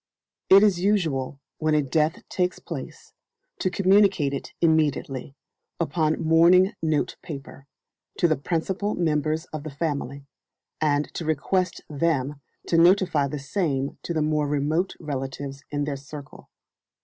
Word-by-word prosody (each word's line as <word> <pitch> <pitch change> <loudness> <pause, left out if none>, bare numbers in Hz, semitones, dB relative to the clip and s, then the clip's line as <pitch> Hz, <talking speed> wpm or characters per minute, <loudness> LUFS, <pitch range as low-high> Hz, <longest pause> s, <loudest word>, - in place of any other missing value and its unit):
It 195 +2 +8
is 200 -5 +3
usual, 160 -9 0 0.2
when 155 -1 +2
a 150 - +3
death 155 +3 0
takes 180 -1 -1
place, 145 -6 -8 0.5
to 185 - +1
communicate 190 -6 +3
it 140 - -5
immediately, 150 -4 +1 0.4
upon 155 -1 0
mourning 170 +5 +5
note 155 -2 0
paper, 140 -2 -9 0.5
to 175 - +4
the 155 - +2
principal 180 +7 -2
members 155 -1 0
of 155 - -4
the 155 - -6
family, 140 -2 -3 0.6
and 145 -1 +1
to - - -4
request 165 +4 0
them 145 -2 -1 0.2
to 165 - +2
notify 175 -4 +4
the 150 - -4
same 140 -2 -2
to - - -5
the 155 - +1
more 150 -1 +1
remote 150 +6 0
relatives 135 -1 -5
in 145 0 -2
their 145 -1 -3
circle. 140 +1 -11
155 Hz, 135 wpm, -25 LUFS, 140-170 Hz, 0.6 s, It